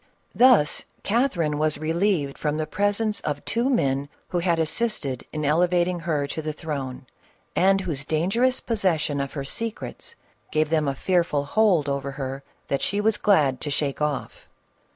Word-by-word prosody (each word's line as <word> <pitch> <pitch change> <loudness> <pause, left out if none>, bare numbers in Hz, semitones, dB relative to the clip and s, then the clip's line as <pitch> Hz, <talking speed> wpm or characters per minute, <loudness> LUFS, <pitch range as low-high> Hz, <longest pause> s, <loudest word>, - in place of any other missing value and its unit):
Thus 240 - +5 0.2
Catherine 180 - +1
was 155 0 +1
relieved 160 -2 0
from 150 0 -2
the 155 - -1
presence 205 +5 0
of 145 -1 -4
two 235 +4 0
men 140 - +1 0.2
who 175 - 0
had 170 -1 +1
assisted 160 - -2
in 155 -1 -3
elevating 175 +3 +2
her 160 -4 -1
to 145 +3 -4
the 155 0 -3
throne, 140 -4 -5 0.5
and 195 +1 +4
whose 160 -7 -3
dangerous 195 - +1
possession 170 - 0
of 140 - -4
her 140 -2 -4
secrets 230 - -5 0.4
gave 155 0 +1
them 155 -2 +2
a 135 - 0
fearful 170 -3 +1
hold 180 -3 +3
upon 140 0 -2
her 135 0 -5 0.3
that 140 - -1
she 200 - 0
was 215 0 +2
glad 150 -11 +3
to 150 - -2
shake 145 0 -1
off. 150 -2 -3
155 Hz, 160 wpm, -24 LUFS, 145-195 Hz, 0.5 s, Thus